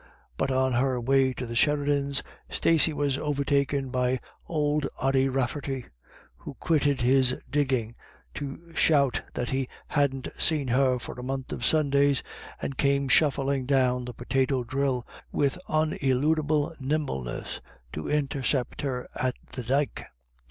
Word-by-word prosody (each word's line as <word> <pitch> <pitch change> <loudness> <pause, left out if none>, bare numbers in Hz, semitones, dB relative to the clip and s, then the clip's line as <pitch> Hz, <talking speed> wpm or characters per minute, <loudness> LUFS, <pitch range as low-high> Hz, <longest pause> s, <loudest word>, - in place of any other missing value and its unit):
But - - -1
on 130 -1 +1
her 125 +1 +1
way 135 +2 +3
to 125 - -5
the 115 - -6
Sheridans, 140 +1 +1 0.3
Stacey 160 -1 +4
was 145 -2 0
overtaken 140 -2 0
by 125 0 +1 0.3
old 150 -2 0
Ody 135 0 +2
Raflerty, 135 0 -2 0.5
who - - -9
quitted 145 -5 +1
his 130 +1 +4
digging 130 -6 0 0.4
to 160 +4 -7
shout 140 -6 +3
that 120 - -2
he 130 -1 -1 0.2
hadn't 140 -3 0
seen 150 -5 +2
her 130 +1 +3
for 120 - -7
a - - -6
month 130 0 -4
of - - -5
Sundays, 140 -1 +3 0.4
and 135 - -5
came 140 -1 +2
shuffling 135 -2 +3
down 125 -2 +2
the 125 - -6
potato 130 +1 0
drill 130 0 -1 0.3
with 140 +5 0
uneludible 155 0 +1
nimbleness 135 - -3 0.3
to 75 - -4
intercept 140 -3 -1
her 130 -3 -3
at 130 -1 -1 0.2
the 130 - -5
dyke. 135 +4 -1
135 Hz, 135 wpm, -27 LUFS, 130-145 Hz, 0.5 s, Stacey